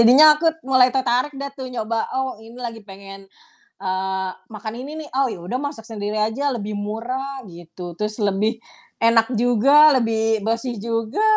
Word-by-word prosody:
Jadinya 250 Hz, +6 st, +8 dB
aku 325 Hz, +1 st, +2 dB
mulai 260 Hz, -1 st, +5 dB
tertarik 255 Hz, +2 st, +1 dB
deh 280 Hz, 0 st, -4 dB
tuh 260 Hz, -2 st, -6 dB
nyoba, 230 Hz, -1 st, -2 dB, 0.2 s
"Oh, 265 Hz, -4 st, -2 dB
ini 230 Hz, +2 st, -13 dB
lagi 230 Hz, -1 st, -5 dB
pengen, 195 Hz, 0 st, -10 dB, 0.6 s
eee, 190 Hz, 0 st, -1 dB, 0.2 s
makan 215 Hz, +1 st, -6 dB
ini 270 Hz, +4 st, -7 dB
nih. 310 Hz, -, -8 dB
Oh, 270 Hz, 0 st, +3 dB
ya 175 Hz, -, -7 dB
udah 250 Hz, +6 st, -2 dB
masak 285 Hz, -6 st, -5 dB
sendiri 210 Hz, -2 st, -4 dB
aja 220 Hz, +6 st, -1 dB
lebih 210 Hz, -2 st, -4 dB
murah," 245 Hz, +7 st, -4 dB
gitu, 175 Hz, 0 st, -10 dB
"terus 210 Hz, +4 st, -3 dB
lebih 200 Hz, +3 st, +1 dB, 0.5 s
enak 230 Hz, +1 st, +4 dB
juga, 275 Hz, +6 st, +6 dB
lebih 225 Hz, -3 st, +1 dB
bersih 230 Hz, +3 st, -1 dB
juga." 230 Hz, -, -1 dB
230 Hz, 165 wpm, -21 LUFS, 210-260 Hz, 0.6 s, Jadinya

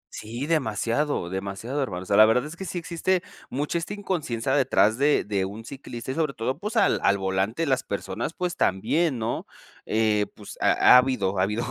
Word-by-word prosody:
Sí, 120 Hz, +5 st, -5 dB
demasiado, 125 Hz, -, 0 dB
demasiado, 100 Hz, +8 st, -3 dB
hermano. 90 Hz, -9 st, -3 dB
O -, -, -12 dB
sea, 100 Hz, -, +1 dB
la 110 Hz, 0 st, +9 dB
verdad 125 Hz, +4 st, +2 dB
es 155 Hz, +2 st, -8 dB
que 190 Hz, -, -7 dB
sí 180 Hz, -, -5 dB
existe 175 Hz, +2 st, -1 dB, 0.3 s
mucha 145 Hz, +5 st, -1 dB
esta 180 Hz, +5 st, -5 dB
inconsciencia 145 Hz, -, -2 dB
detrás 125 Hz, -5 st, +3 dB
de 145 Hz, +1 st, +3 dB
de 100 Hz, -2 st, -1 dB
un 105 Hz, +4 st, -6 dB
ciclista 130 Hz, -2 st, -7 dB
y -, -, -2 dB
sobre 155 Hz, -2 st, -1 dB
todo, 130 Hz, +6 st, -2 dB
pues, 210 Hz, +4 st, -5 dB
al -, -, +3 dB
al 100 Hz, -, +3 dB
volante 95 Hz, +9 st, -1 dB
las 130 Hz, -3 st, +1 dB
personas, 100 Hz, -, -4 dB
pues, 180 Hz, -1 st, -2 dB
también, 140 Hz, -, +1 dB
¿no? 115 Hz, 0 st, -3 dB, 0.4 s
Eh, 110 Hz, -1 st, +2 dB
pues -, -, -10 dB
ha -, -, +6 dB
habido 115 Hz, -7 st, +1 dB
ha -, -, +4 dB
habido, 105 Hz, +4 st, -1 dB
125 Hz, 195 wpm, -25 LUFS, 105-150 Hz, 0.4 s, la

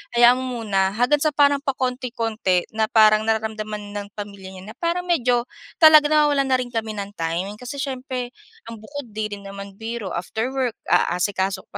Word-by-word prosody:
hayaan 240 Hz, +1 st, +6 dB
mo 250 Hz, -3 st, -4 dB
muna." 195 Hz, -2 st, +1 dB
Hanggang 250 Hz, +6 st, +3 dB
sa 305 Hz, -2 st, 0 dB
parang 285 Hz, -1 st, +4 dB
pakonti-konti, 235 Hz, -8 st, -1 dB
na 220 Hz, 0 st, 0 dB
parang 215 Hz, 0 st, +5 dB
nararamdaman 215 Hz, -2 st, -2 dB
ng 205 Hz, 0 st, -4 dB
pamilya 200 Hz, -2 st, -8 dB
niya 190 Hz, +3 st, -10 dB
na -, -, -15 dB
parang 345 Hz, +1 st, -1 dB
medyo 250 Hz, -9 st, +1 dB, 0.4 s
talaga 310 Hz, -1 st, +9 dB
nawawalan 295 Hz, -2 st, +3 dB
na 260 Hz, -, +3 dB
rin 250 Hz, -1 st, -3 dB
kami 225 Hz, -2 st, -3 dB
ng 200 Hz, 0 st, -5 dB
time. 175 Hz, +6 st, -3 dB
Kasi 250 Hz, +2 st, -7 dB
siyempre, 260 Hz, -2 st, -4 dB, 0.3 s
ang 230 Hz, -1 st, -9 dB
bukod 285 Hz, +5 st, -8 dB
'di 215 Hz, +1 st, -3 dB
rin 200 Hz, -, -14 dB
naman 200 Hz, 0 st, -9 dB
biro, 225 Hz, -3 st, -5 dB
after 220 Hz, +8 st, -3 dB
work 255 Hz, -4 st, -1 dB
aasikaso 190 Hz, +1 st, 0 dB
ka -, -, -66 dB
225 Hz, 180 wpm, -22 LUFS, 205-260 Hz, 0.4 s, talaga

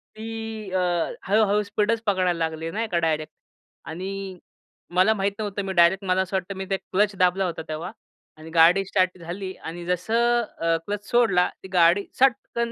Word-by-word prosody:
ती 220 Hz, +1 st, -7 dB, 0.4 s
अ, 185 Hz, -, +1 dB, 0.4 s
हळू-हळू 210 Hz, +1 st, +3 dB
स्पीडच 215 Hz, +2 st, 0 dB
पकडायला 185 Hz, -3 st, +2 dB
लागली 160 Hz, 0 st, -2 dB
नाही 225 Hz, +3 st, -2 dB
का 175 Hz, -, +1 dB
डायरेक्ट. 155 Hz, -2 st, -1 dB, 0.5 s
आणि 190 Hz, +2 st, -6 dB, 0.6 s
मला 185 Hz, +4 st, +5 dB
माहीत 200 Hz, -1 st, 0 dB
नव्हतं, 205 Hz, -1 st, -3 dB
मी 190 Hz, -, -3 dB
डायरेक्ट 185 Hz, +2 st, +4 dB
मला 185 Hz, 0 st, +2 dB
असं 190 Hz, +1 st, -3 dB
वाटतं 190 Hz, +1 st, -3 dB
मी 190 Hz, -, -4 dB
ते 195 Hz, -, +1 dB
क्लच 205 Hz, +2 st, 0 dB
दाबला 185 Hz, +1 st, +3 dB
होता 170 Hz, -2 st, -3 dB
तेव्हा 155 Hz, +4 st, -5 dB, 0.5 s
आणि 155 Hz, +1 st, -11 dB
गाडी 170 Hz, +4 st, +5 dB
स्टार्ट 185 Hz, -1 st, +1 dB
झाली 185 Hz, +3 st, -6 dB
आणि 170 Hz, +1 st, -8 dB
जसं 220 Hz, -2 st, +1 dB
क्लच 205 Hz, 0 st, -4 dB
सोडला 210 Hz, -7 st, +3 dB
ती 190 Hz, -, -8 dB
गाडी 175 Hz, +3 st, +4 dB
सटकन 235 Hz, -3 st, +1 dB
190 Hz, 165 wpm, -24 LUFS, 175-205 Hz, 0.6 s, मला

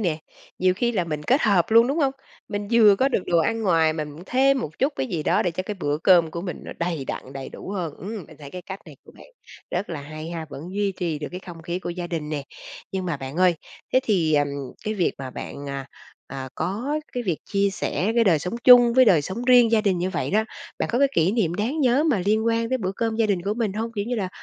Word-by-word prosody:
nè, 170 Hz, -7 st, 0 dB, 0.4 s
nhiều 185 Hz, 0 st, +3 dB
khi 240 Hz, +4 st, 0 dB
là 185 Hz, -6 st, 0 dB
mình 150 Hz, -2 st, -4 dB
kết 260 Hz, -, +2 dB
hợp 200 Hz, -4 st, +3 dB
luôn, 230 Hz, +2 st, +7 dB
đúng 285 Hz, +5 st, -1 dB
hông? 275 Hz, -3 st, +2 dB, 0.4 s
Mình 205 Hz, -1 st, -4 dB
vừa 215 Hz, -4 st, +6 dB
có 265 Hz, +4 st, +3 dB
được 205 Hz, -, 0 dB
đồ 170 Hz, -, +3 dB
ăn 225 Hz, +7 st, 0 dB
ngoài 165 Hz, -5 st, +3 dB
mà 155 Hz, -1 st, -3 dB
mình 150 Hz, +3 st, -10 dB
thêm 270 Hz, +1 st, +3 dB
một 150 Hz, -6 st, -6 dB
chút 275 Hz, +3 st, +1 dB
cái -, -, -1 dB
gì 175 Hz, -10 st, -3 dB
đó -, -, +2 dB
để 175 Hz, -, 0 dB
cho 180 Hz, +3 st, -4 dB
cái 210 Hz, +2 st, -5 dB
bữa 150 Hz, -5 st, -2 dB
cơm 170 Hz, -2 st, +5 dB
của 170 Hz, -, -5 dB
mình 175 Hz, -1 st, -5 dB
nó -, -, -7 dB
đầy 170 Hz, -4 st, -2 dB
đặn, 130 Hz, 0 st, -6 dB
đầy 135 Hz, -1 st, -6 dB
đủ -, -, -9 dB
hơn, 175 Hz, -7 st, -3 dB
ưm, 200 Hz, +1 st, -6 dB
mình 155 Hz, -, -15 dB
thấy 145 Hz, -2 st, -10 dB
cái 180 Hz, +2 st, -7 dB
cách 190 Hz, +2 st, -8 dB
này -, -, -12 dB
của -, -, -16 dB
bạn -, -, -15 dB, 0.4 s
rất 180 Hz, +2 st, -2 dB
là 160 Hz, -4 st, -4 dB
hay 155 Hz, +3 st, -8 dB
ha, 165 Hz, -2 st, -5 dB
vẫn 140 Hz, -, -8 dB
duy 205 Hz, -1 st, 0 dB
trì 170 Hz, -4 st, -3 dB
được 150 Hz, -, -5 dB
cái 180 Hz, -, -6 dB
không 170 Hz, -3 st, -11 dB
khí 175 Hz, +2 st, -3 dB
của 185 Hz, -, -5 dB
gia 175 Hz, 0 st, -4 dB
đình 165 Hz, -3 st, -4 dB
nè. 150 Hz, -2 st, -3 dB, 0.5 s
Nhưng 190 Hz, -1 st, -2 dB
mà 170 Hz, -4 st, -1 dB
bạn 135 Hz, +2 st, -7 dB
ơi, 180 Hz, -1 st, +4 dB, 0.4 s
thế 255 Hz, -, +5 dB
thì, 175 Hz, -10 st, +2 dB
ừm, 145 Hz, -1 st, +3 dB, 0.4 s
cái 215 Hz, -, -1 dB
việc 185 Hz, -5 st, +1 dB
mà 130 Hz, -1 st, -6 dB
bạn, 140 Hz, +2 st, -7 dB
à, 140 Hz, -1 st, -5 dB, 0.4 s
à, 130 Hz, -1 st, -6 dB
có 255 Hz, +11 st, -2 dB
cái 245 Hz, -, -2 dB
việc 175 Hz, -7 st, -1 dB
chia 200 Hz, 0 st, +1 dB
sẻ 205 Hz, +2 st, -1 dB
cái 235 Hz, -1 st, +4 dB
đời 170 Hz, -6 st, +4 dB
sống 180 Hz, +8 st, -4 dB
chung 245 Hz, -2 st, +8 dB
với 260 Hz, 0 st, +7 dB
đời 175 Hz, -10 st, +5 dB
sống 205 Hz, +10 st, -5 dB
riêng 245 Hz, -2 st, +6 dB
gia 225 Hz, -, +5 dB
đình 195 Hz, -4 st, +1 dB
như 185 Hz, +2 st, -1 dB
vậy -, -, -2 dB
đó, 215 Hz, +2 st, +2 dB, 0.3 s
bạn -, -, -1 dB
có 240 Hz, -, +2 dB
cái 280 Hz, 0 st, +4 dB
kỷ 170 Hz, +4 st, +3 dB
niệm 190 Hz, -8 st, +1 dB
đáng 235 Hz, -, -1 dB
nhớ 265 Hz, +2 st, +3 dB
mà 225 Hz, -, +2 dB
liên 220 Hz, +2 st, +2 dB
quan 230 Hz, 0 st, +1 dB
đến 260 Hz, 0 st, -1 dB
bữa 190 Hz, -2 st, -2 dB
cơm 225 Hz, -1 st, -1 dB
gia 225 Hz, -1 st, +2 dB
đình 195 Hz, -4 st, 0 dB
của 200 Hz, +3 st, -1 dB
mình 220 Hz, -4 st, -1 dB
hông? 225 Hz, +2 st, -3 dB
Kiểu 205 Hz, -3 st, -2 dB
như 245 Hz, +3 st, -2 dB
là 200 Hz, -5 st, -2 dB
190 Hz, 280 wpm, -24 LUFS, 165-225 Hz, 0.5 s, chung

